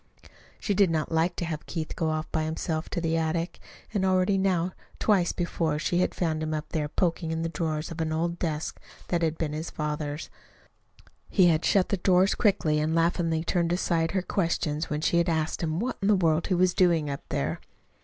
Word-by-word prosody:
She 205 - 0
did 195 -2 +4
not 160 -1 -1
like 165 +2 +1
to 175 - -3
have 155 -2 -5
Keith 160 -2 -4
go 160 - 0
off 155 0 -1
by 155 -1 0
himself 160 0 -3
to - - -2
the 165 -1 0
attic, 165 +2 -1 0.3
and 200 -3 0
already 185 +1 +3
now 185 -2 +1 0.3
twice 190 -5 +2
before 165 -3 -1
she 175 +3 0
had 180 - +1
found 160 -3 -1
him 155 0 -1
up 155 0 -5
there, 150 -2 -1
poking 165 0 0
in 160 0 -2
the 165 - -1
drawers 160 -1 -2
of 165 0 -4
an 160 -1 -1
old 170 +2 -1
desk 155 -3 -3 0.3
that 175 -1 +1
had 160 -1 0
been 150 -2 -2
his 155 +2 -4
father's. 150 0 -4 1.0
He 185 -4 +5
had 160 -1 +2
shut 195 -2 +3
the 200 - +1
drawers 185 +1 +4
quickly 185 -8 +2
and 155 +1 0
had - - +2
laughingly 165 -1 +1
turned 170 0 0
aside 170 -2 +1
her 190 -2 0
questions 165 -5 -1
when 150 0 -2
she 170 +2 +2
had 170 - +1
asked 160 -1 -1
him 160 0 -1
what 250 +5 -2
in 195 - +1
the 210 - +5
world 165 -3 +2
he 185 - +1
was 180 0 +3
doing 170 -5 +3
up 140 -1 -4
there. - - -1
165 Hz, 215 wpm, -27 LUFS, 155-180 Hz, 1.0 s, He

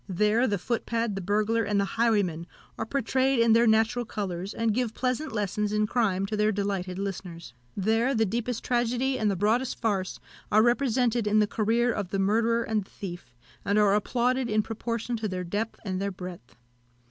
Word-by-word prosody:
There 210 +6 +2
the 205 - 0
footpad, 230 +2 -2
the 195 - -4
burglar, 215 +4 +1
and 205 -1 0
the 200 - +2
highwayman 200 -8 +1 0.3
are - - -4
portrayed 265 +1 +1
in 230 -1 +5
their 230 +1 +5
natural 225 +2 +3
colours, 195 -4 -4
and 225 -1 0
give 235 -1 -1
pleasant 255 +4 -1
lessons 210 -1 -1
in 210 0 +2
crime 205 -4 +1
to 215 - -3
their 210 0 +2
delighted 195 -3 -2
listeners. 180 -8 -6 0.2
There 225 +6 +1
the 225 -1 +3
deepest 235 +3 -3
tragedy 245 +2 0
and 215 - +2
the 200 - 0
broadest 225 +7 0
farce 200 -5 -1 0.3
are 215 +1 +5
represented 240 -2 +2
in 210 +1 +3
the 210 - +5
career 230 +3 +1
of 205 -4 -3
the 195 - -2
murderer 230 +4 +2
and 220 -2 -1
the - - -23
thief, 175 -10 -8 0.3
and 200 +1 +1
are 205 -2 +4
applauded 245 +4 +1
in 215 0 +2
proportion 230 +2 -3
to 220 -1 -2
their 185 -2 -3
depth 205 +6 -3
and 185 -1 -2
their 200 0 -1
breadth. 180 - -9
215 Hz, 190 wpm, -27 LUFS, 195-235 Hz, 0.3 s, in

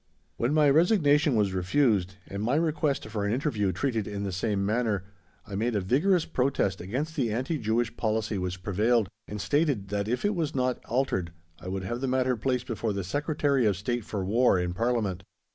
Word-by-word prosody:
When 120 +3 0
my 150 -1 +5
resignation 150 - +4
was 100 -3 +2
refused 95 0 +1
and 100 +1 -6
my 120 +6 +1
request 155 -5 0
for 105 -1 -3
an 100 - 0
interview 115 -6 0
treated 115 -3 -1
in 100 -1 -4
the 100 - -2
same 100 +2 -1
manner, 110 -3 0 0.4
I 100 - -10
made 110 +4 0
a - - +2
vigorous 155 - +2
protest 125 - 0
against 135 - -3
the 125 -8 0
anti 130 +8 -1
Jewish 110 +1 0
policy 110 -2 -1
which 90 0 -4
prevailed, 110 +2 +2 0.2
and 105 - -6
stated 145 -6 0
that 100 0 -1
if 125 - -1
it 205 - +2
was 160 -5 -2
not 130 -1 0
altered 105 -10 -1 0.3
I - - -10
would 95 0 -3
have 120 +6 -4
the 135 - -1
matter 130 0 +1
placed 125 +2 -1
before 115 -2 -2
the 100 -1 -3
Secretary 145 - +1
of 100 -3 +1
State 120 +4 -2
for 100 -2 -4
War 115 +1 +3
in 90 0 -1
Parliament. 110 -3 0
115 Hz, 195 wpm, -28 LUFS, 100-135 Hz, 0.4 s, my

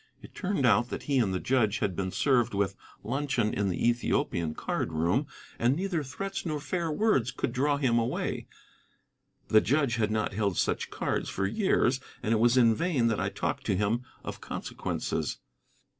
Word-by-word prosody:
It - - -12
turned 190 -8 -1
out 120 +1 +4
that - - -5
he 140 -2 +1
and 105 -6 +2
the 95 - -1
judge 120 -3 +2
had 95 -5 -1
been 95 0 -2
served 120 0 +2
with 100 -1 0 0.3
luncheon 130 -3 0
in 100 -1 0
the 90 - 0
Ethiopian 85 -9 0
card - - -2
room, 85 - +1 0.3
and 120 +3 +3
neither 180 -1 -1
threats 195 +9 -4
nor 155 -4 -2
fair 170 +2 -2
words 150 - +2
could 120 - -3
draw 140 +3 +2
him 125 -4 +2
away. 115 - -2 1.0
The 110 - +6
judge 135 -3 +1
had 110 -2 +1
not 110 -1 -1
held 100 -3 0
such - - 0
cards - - -2
for 95 - -1
years, 130 - +2 0.2
and 110 - +1
it 110 - +2
was 120 +2 +4
in 115 -3 +6
vain 130 -3 +1
that 110 - 0
I - - 0
talked - - -3
to 95 - +2
him 105 +5 0 0.2
of - - -6
consequences. - - -3
120 Hz, 185 wpm, -29 LUFS, 105-140 Hz, 1.0 s, The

